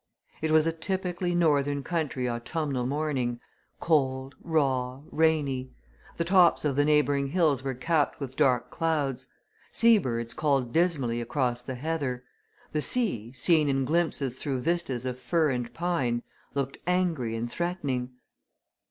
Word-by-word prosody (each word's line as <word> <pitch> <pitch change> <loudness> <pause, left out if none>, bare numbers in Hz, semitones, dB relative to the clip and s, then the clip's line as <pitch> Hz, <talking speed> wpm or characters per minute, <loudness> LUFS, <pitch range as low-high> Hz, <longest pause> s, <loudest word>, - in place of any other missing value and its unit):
It 160 - 0
was 155 0 +5
a 165 - +2
typically 180 +1 -2
North 150 -5 +3 0.2
Country 150 -7 -2
autumnal 125 +2 -2
morning, 135 -4 -1 0.4
cold, 135 -4 +1
raw, 135 -5 0
rainy; 145 -5 +1 0.4
the 170 - +1
tops 175 -2 +4
of 140 -3 +1
the 145 - +3
neighbouring 145 -2 +2
hills 150 -4 +2
were 135 -1 -2
capped 155 +3 0
with 135 -2 -6
dark 125 -3 +2
clouds; 140 -6 -1 0.4
sea 230 -2 +5
birds 115 -6 -2
called 135 -5 0
dismally 140 -9 +1
across 120 0 -1
the 130 +1 -6
heather; 135 -3 -2 0.5
the 155 - 0
sea, 150 - 0
seen 155 +1 +3
in 135 -1 +1
glimpses 145 -5 0
through 135 -4 -2
vistas 150 -6 -1
of 125 0 -3
fir 160 +1 +1
and 125 -2 -3
pine, 135 -9 -1 0.3
looked 140 -1 -2
angry 170 -11 0
and 120 +1 -3
threatening. 140 -6 -2
140 Hz, 140 wpm, -28 LUFS, 125-165 Hz, 0.5 s, was